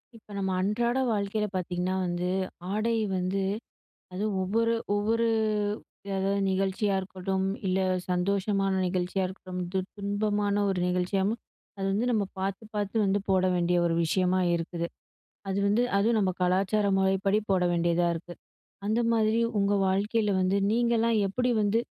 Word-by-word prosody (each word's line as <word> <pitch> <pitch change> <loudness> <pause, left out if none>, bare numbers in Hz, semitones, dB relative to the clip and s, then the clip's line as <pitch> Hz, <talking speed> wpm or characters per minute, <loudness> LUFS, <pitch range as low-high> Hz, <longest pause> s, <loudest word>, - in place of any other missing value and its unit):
இப்போ 215 -2 -16
நம்ம 190 -1 -1
அன்றாட 235 +6 +1 0.2
வாழ்க்கையில 210 +1 -1
பார்த்தீங்கன்னா 180 0 -1
வந்து, 175 0 -2 0.4
ஆடை 215 +3 0 0.2
வந்து. 185 +2 -1 0.7
அதுவும் 200 +1 -1
ஒவ்வொரு 230 +4 +1 0.2
ஒவ்வொரு 225 +3 +1 0.9
அதாவது 195 +1 0
நிகழ்ச்சியா 195 +2 0
இருக்கட்டும், 190 0 -2 0.2
இல்ல 185 +1 +1 0.3
சந்தோஷமான 195 +2 +1
நிகழ்ச்சியா 185 +1 -1
இருக்கட்டும், 185 -1 -7
து 190 - +2 0.2
துன்பமான 205 0 0
ஒரு 190 -2 0
நிகழ்ச்சியாவும் 190 +5 0 0.4
அது 195 - -2
வந்து 210 +5 +1
நம்ம 215 -3 +2 0.2
பார்த்து 195 +3 -3
பார்த்து 205 0 -2
வந்து 195 +1 +2
போட 190 -1 +3
வேண்டிய 175 0 +2
ஒரு 170 - +1
விஷயமா 185 +2 +2 0.2
இருக்குது. 170 0 -3 0.6
அது 195 0 -1
வந்து 210 +4 +3
அதுவும் 220 +3 +3
நம்ம 195 -3 +2
கலாச்சார 195 +3 +2
முறைப்படி 195 +2 +2
போட 185 -2 +3
வேண்டியதா 170 0 +2
இருக்கு. 175 +1 -8 0.5
அந்த 220 +3 +1
மாதிரி 220 0 +2 0.2
உங்க 200 0 +2
வாழ்க்கையில 210 +3 +1
வந்து 185 +2 +2
நீங்கலாம் 230 0 +2
எப்படி 245 +6 0
வந்து 205 +2 +2
195 Hz, 135 wpm, -28 LUFS, 185-210 Hz, 0.9 s, போட